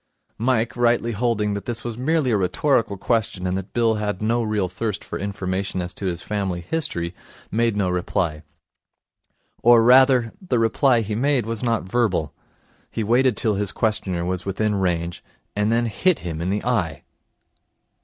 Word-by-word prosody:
Mike, 115 Hz, -1 st, +1 dB
rightly 120 Hz, -1 st, +2 dB
holding 105 Hz, -2 st, 0 dB
that 100 Hz, -, -5 dB
this 120 Hz, -2 st, -1 dB
was 120 Hz, -2 st, -4 dB
merely 140 Hz, +2 st, +1 dB
a -, -, +3 dB
rhetorical 105 Hz, +2 st, +1 dB
question 100 Hz, -3 st, -1 dB
and 90 Hz, 0 st, 0 dB
that 95 Hz, +1 st, -5 dB
Bill 115 Hz, -2 st, +2 dB
had 105 Hz, -2 st, -2 dB
no 115 Hz, +3 st, +1 dB
real 105 Hz, -4 st, 0 dB
thirst 100 Hz, +3 st, -4 dB
for -, -, -6 dB
information 95 Hz, -1 st, -3 dB
as 90 Hz, 0 st, -4 dB
to 100 Hz, -, -4 dB
his 90 Hz, 0 st, -3 dB
family 100 Hz, -4 st, -2 dB
history, 85 Hz, -, -2 dB, 0.4 s
made 115 Hz, -1 st, +1 dB
no 100 Hz, -2 st, +1 dB
reply. 90 Hz, -3 st, -1 dB, 1.2 s
Or, 120 Hz, -1 st, +6 dB
rather, 125 Hz, -1 st, +5 dB
the 155 Hz, -10 st, -1 dB
reply 115 Hz, +2 st, +3 dB
he 105 Hz, 0 st, -3 dB
made 130 Hz, +1 st, +1 dB
was 115 Hz, -1 st, -3 dB
not 115 Hz, -4 st, 0 dB
verbal. 95 Hz, -7 st, 0 dB, 0.6 s
He 115 Hz, -, -3 dB
waited 120 Hz, +1 st, +3 dB
till 110 Hz, -, +1 dB
his 100 Hz, -1 st, -1 dB
questioner 95 Hz, -6 st, -1 dB
was 90 Hz, 0 st, -2 dB
within 105 Hz, +2 st, -1 dB
range, 85 Hz, -3 st, -1 dB, 0.3 s
and 105 Hz, +2 st, +1 dB
then 120 Hz, +1 st, +2 dB
hit 140 Hz, -, +1 dB
him 80 Hz, -2 st, -4 dB
in 90 Hz, -, -1 dB
the 105 Hz, +3 st, -2 dB
eye. 90 Hz, -, -1 dB
105 Hz, 170 wpm, -22 LUFS, 95-120 Hz, 1.2 s, Or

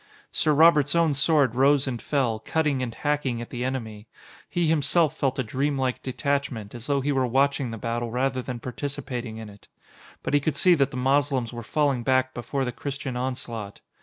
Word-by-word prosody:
Sir 155 Hz, -, +2 dB
Robert's 150 Hz, -1 st, +5 dB
own 165 Hz, -3 st, +3 dB
sword 140 Hz, -2 st, +3 dB
rose 135 Hz, +2 st, +4 dB
and 125 Hz, -4 st, -3 dB
fell, 125 Hz, -7 st, 0 dB
cutting 150 Hz, +2 st, 0 dB
and 125 Hz, -2 st, -2 dB
hacking 145 Hz, -5 st, -1 dB
at 120 Hz, -, -7 dB
the 120 Hz, 0 st, -3 dB
enemy. 115 Hz, -5 st, -4 dB, 0.4 s
He 175 Hz, -1 st, 0 dB
himself 155 Hz, 0 st, +2 dB
felt 135 Hz, -2 st, -1 dB
a 130 Hz, -, 0 dB
dreamlike 130 Hz, +1 st, -1 dB
detachment, 130 Hz, -4 st, -2 dB
as 120 Hz, 0 st, -7 dB
though 140 Hz, -1 st, +1 dB
he 145 Hz, +2 st, 0 dB
were 130 Hz, -2 st, +1 dB
watching 135 Hz, +1 st, +1 dB
the 115 Hz, -, -5 dB
battle 115 Hz, +1 st, -3 dB
rather 130 Hz, +2 st, 0 dB
than 125 Hz, -1 st, -5 dB
participating 125 Hz, -2 st, -4 dB
in 110 Hz, -1 st, -7 dB
it. 100 Hz, 0 st, -15 dB, 0.6 s
But -, -, -3 dB
he 145 Hz, -, +5 dB
could 150 Hz, +2 st, -1 dB
see 180 Hz, -1 st, +5 dB
that 140 Hz, -5 st, +2 dB
the -, -, -7 dB
Moslems 135 Hz, -2 st, +1 dB
were 120 Hz, -, -5 dB
falling 140 Hz, +1 st, 0 dB
back 130 Hz, +1 st, +1 dB
before 135 Hz, +3 st, -2 dB
the 125 Hz, -, -2 dB
Christian 140 Hz, 0 st, -5 dB
onslaught. 125 Hz, -5 st, -4 dB
130 Hz, 195 wpm, -25 LUFS, 120-145 Hz, 0.6 s, Robert's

